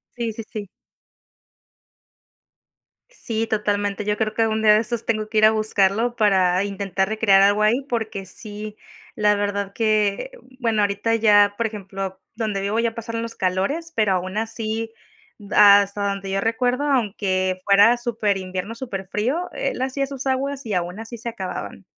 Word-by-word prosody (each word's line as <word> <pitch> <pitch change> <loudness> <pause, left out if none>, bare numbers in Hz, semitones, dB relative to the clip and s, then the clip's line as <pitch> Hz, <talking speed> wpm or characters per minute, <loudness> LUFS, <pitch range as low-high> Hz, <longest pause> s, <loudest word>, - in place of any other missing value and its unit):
Sí, 230 -2 -3
sí, 225 - -7
sí. 205 -3 -6 2.4
Sí, 225 - -3
totalmente. 205 -1 -1
Yo 210 0 0
creo 215 -1 -1
que 225 - +2
algún 220 0 0
día 210 -1 +6
de 215 - +5
estos 230 0 -3
tengo 215 -1 -1
que 215 - +1
ir 215 - +6
a - - +8
buscarlo 215 +2 +1
para 190 -3 +3
intentar 195 -1 -2
recrear 215 -3 +4
algo 205 +2 +4
ahí, 235 +6 +3
porque 220 -5 -3
sí, 210 +1 -7 0.4
la 210 -1 +3
verdad 200 -1 -2
que, 215 - +1
um, - - -23
bueno, 225 -3 +1
ahorita 205 +3 0
ya, 205 -2 +4
por 230 - 0
ejemplo, 195 -3 -5 0.2
donde 215 -4 -2
vivo 205 +3 -1
ya 230 -1 0
pasaron 230 0 -4
los 230 - -6
calores, 195 - -1
pero 215 -3 +2
aún 185 +3 -3
así, 225 0 -3 0.5
b 205 -1 -7
hasta 200 0 +6
donde 200 -1 -4
yo 195 - 0
recuerdo, 245 +4 0
aunque 195 -8 0
fuera 205 +4 +6
superinvierno, 205 -4 -2
superfrío, 235 - -3
él - - -3
hacía 270 +1 -1
sus 270 0 -6
aguas 275 +1 -1
y 215 - -2
aún 180 +3 -3
así 225 +1 -8
se 235 +1 -5
acababan. 190 -6 -6
215 Hz, 165 wpm, -22 LUFS, 200-230 Hz, 2.4 s, a